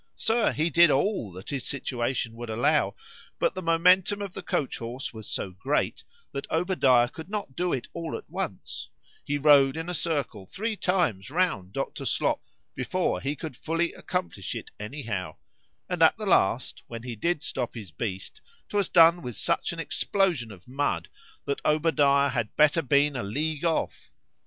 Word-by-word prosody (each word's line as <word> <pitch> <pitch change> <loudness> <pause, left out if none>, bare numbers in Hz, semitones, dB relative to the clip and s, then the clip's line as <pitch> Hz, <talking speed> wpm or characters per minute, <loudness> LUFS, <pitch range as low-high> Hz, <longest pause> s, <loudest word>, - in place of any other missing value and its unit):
—Sir, 225 +1 +2
he 160 +2 0
did 170 +2 +7
all 145 - +1
that 95 +1 -8
his 135 -3 -2
situation 120 -3 -2
would 120 0 -7
allow;—but 110 +2 -1
the 185 - -5
MOMENTUM 180 +4 +4
of 200 -3 -5
the 195 - -6
coach 145 -6 -2
horse 120 +3 -5
was 110 -2 -8
so 95 - -3
great, 130 +11 -1 0.3
that 140 0 -5
Obadiah 160 -8 +3
could 160 +7 -10
not 205 -11 -4
do 180 0 0
it 130 - -2
all 165 -1 -4
at 440 - -12
once; - - -5 0.3
he 145 - -1
rode 145 -1 +5
in 165 +2 -4
a - - -2
circle 145 - -2
three 220 - -3
times 175 - 0
round 155 - 0
Dr. 135 +1 -3
Slop, - - +1 0.3
before 180 +8 -1
he 140 +2 -2
could 155 -2 -7
fully 165 +5 -1
accomplish 180 - -4
it - - -7
any 135 +8 -6
how;—and 105 - -6
at 160 - +6
the 215 - -5
last, 125 - +2
when 115 -1 -7
he 125 -2 -5
did 170 +7 -1
stop 125 -2 -3
his 105 -7 -8
beast, 95 +4 -5 0.3
'twas 205 -3 +1
done 170 0 +6
with 125 - -6
such - - +1
an - - -7
explosion 175 - 0
of 95 0 -14
mud, 125 -11 -1 0.4
that 140 - -2
Obadiah 145 -3 +3
had 115 -4 -2
better 150 +2 +5
have 135 - -17
been 145 0 +4
a 125 - -1
league 150 +9 -2
off. 165 -1 -1
145 Hz, 175 wpm, -27 LUFS, 120-170 Hz, 0.4 s, did